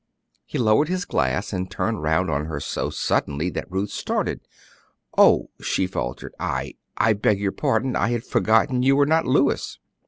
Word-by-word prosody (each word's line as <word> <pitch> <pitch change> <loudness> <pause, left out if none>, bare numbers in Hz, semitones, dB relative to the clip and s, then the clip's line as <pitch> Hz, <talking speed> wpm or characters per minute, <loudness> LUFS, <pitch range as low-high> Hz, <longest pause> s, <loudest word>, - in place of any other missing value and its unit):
He - - -5
lowered 115 +5 +3
his 185 0 -1
glass 65 -2 -1
and 95 0 -3
turned 110 +3 -2
round 80 +4 +1
on 75 0 -1
her 75 -2 -4
so - - -3
suddenly 75 +5 -1
that - - -6
Ruth 95 +2 -2
started. - - -2 0.7
"Oh," - - +5
she 95 - 0
faltered, 90 - -5
"I 65 -1 -3 0.2
I 110 - +4
beg 105 -1 +1
your 100 -1 0
pardon; 125 +6 0
I - - +1
had 120 -1 -1
forgotten 115 +4 +2
you 135 +2 +4
were 145 0 +4
not 160 +2 +2
Louis." - - +1
100 Hz, 175 wpm, -23 LUFS, 80-120 Hz, 0.7 s, Oh